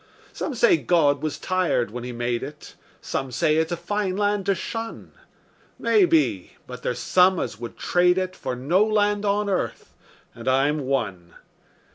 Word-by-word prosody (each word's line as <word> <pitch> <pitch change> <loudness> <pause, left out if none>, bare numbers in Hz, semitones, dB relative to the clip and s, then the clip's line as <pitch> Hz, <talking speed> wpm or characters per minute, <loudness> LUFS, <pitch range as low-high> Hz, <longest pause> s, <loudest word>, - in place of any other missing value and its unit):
Some 285 - -4
say 235 -6 +4
God 145 0 +2
was 155 -1 -3
tired 180 - 0
when 120 +1 -6
He 125 - -5
made 120 0 -2
it; 150 +2 -9 0.3
Some 135 -1 -3
say 150 +6 +2
it's 160 +1 0
a 175 - -1
fine 200 0 -2
land 205 -1 0
to 195 - +3
shun; 225 +5 -6 0.7
Maybe; 345 -7 +2
but - - -9
there's - - -2
some 185 -1 +3
as 105 - -4
would 120 0 -8
trade 180 0 +2
it 185 0 -2
For 130 - -4
no 160 +11 +2
land 210 -1 +1
on 205 +1 +1
earth 195 -2 -3 0.4
and 115 +1 -10
I'm 140 +4 +2
one. 100 -11 -3
175 Hz, 165 wpm, -24 LUFS, 130-205 Hz, 0.7 s, say